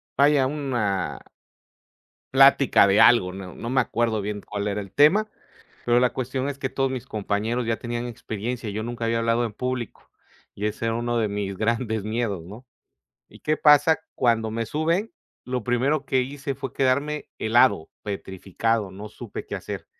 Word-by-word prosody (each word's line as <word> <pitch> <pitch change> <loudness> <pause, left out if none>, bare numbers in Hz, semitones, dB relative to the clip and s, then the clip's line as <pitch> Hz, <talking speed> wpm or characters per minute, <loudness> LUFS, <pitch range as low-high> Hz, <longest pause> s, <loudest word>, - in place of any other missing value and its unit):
vaya 140 -1 +4
una 120 -10 -2 1.1
plática 135 -5 +6
de 100 +1 +3
algo, 95 -7 +5
no, 95 -3 -8
no 115 - -6
me 130 0 +3
acuerdo 115 -3 -1
bien 105 0 -4
cuál 100 0 -5
era 105 0 -1
el 100 -2 -9
tema, 195 +10 +4 0.6
pero 120 0 +3
la 125 0 +2
cuestión 130 +1 -2
es 140 -1 -5
que 135 - -2
todos 135 -1 -1
mis 130 -3 -5
compañeros 110 +3 -2
ya 115 0 0
tenían 120 0 -4
experiencia. 115 0 -5
Yo 110 +2 -3
nunca 120 0 -4
había 115 0 +1
hablado 115 +1 +1
en 110 - -4
público 125 -1 -5 0.4
y 105 +1 -2
ese 110 +2 -4
era 115 - +1
uno 120 0 -1
de 110 -2 +1
mis 100 -2 -4
grandes 110 -1 -1
miedos, 110 -5 -2
¿no? 105 +7 -11 0.6
Y - - -17
qué 155 0 0
pasa, 150 +2 +5 0.2
cuando 115 -2 +1
me 115 0 -3
suben, 165 - 0 0.4
lo 125 -3 -3
primero 135 +4 +1
que 130 -1 +1
hice 140 +1 -4
fue 135 - -7
quedarme 140 +3 0
helado, 115 -7 +3
petrificado. 100 +2 -2
No 105 +3 -9
supe 115 0 -8
qué - - -5
hacer. - - -6
120 Hz, 175 wpm, -24 LUFS, 105-130 Hz, 1.1 s, plática